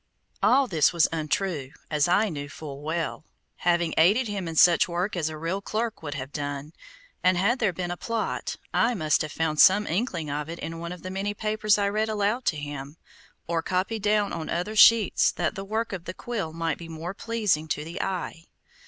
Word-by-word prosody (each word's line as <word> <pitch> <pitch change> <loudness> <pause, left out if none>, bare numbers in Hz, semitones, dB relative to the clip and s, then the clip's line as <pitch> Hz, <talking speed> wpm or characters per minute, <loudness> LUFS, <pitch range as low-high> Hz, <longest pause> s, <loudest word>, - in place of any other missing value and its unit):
All 270 +2 +5
this 165 - +3
was 170 -2 +3
untrue, 155 -2 -2 0.2
as 150 0 +2
I 200 +5 +3
knew 145 -4 -5
full 140 -2 -8
well, 160 +1 -3 0.3
having 170 -2 +1
aided 210 +10 +4
him 200 -4 -3
in 165 - -5
such 175 +2 +6
work 180 +4 -1
as 160 -3 -1
a 155 - -7
real 165 +5 -2
clerk 220 +2 -3
would 145 -2 -5
have 135 0 -6
done, 145 +1 -4 0.5
and 185 0 +4
had 225 +8 +2
there 215 -5 +2
been 175 0 -4
a 175 - -4
plot, 230 +2 -3 0.2
I 240 +1 +2
must 155 -5 +2
have 155 - -3
found 155 -2 -1
some 205 +2 +7
inkling 175 - -2
of 150 +2 -3
it 170 - -5
in 165 +1 -6
one 170 +1 -5
of 180 -2 -9
the 185 - -5
many 200 +2 -2
papers 215 -1 +1
I 200 -1 +1
read 215 +2 0
aloud 215 +4 0
to 155 - +1
him, 145 0 -7 0.5
or 165 0 -1
copied 190 +6 -1
down 210 0 +1
on 160 -2 -4
other 180 +6 -2
sheets 220 -1 +6
that 170 -2 -1
the 195 -2 -6
work 220 +2 -2
of 180 -2 -6
the 170 - -6
quill 215 -9 -4
might 165 -1 -2
be 165 -1 -9
more 165 +3 -5
pleasing 210 -8 0
to 150 - -2
the 165 +4 -5
eye. 180 -3 -4
175 Hz, 210 wpm, -26 LUFS, 160-205 Hz, 0.5 s, some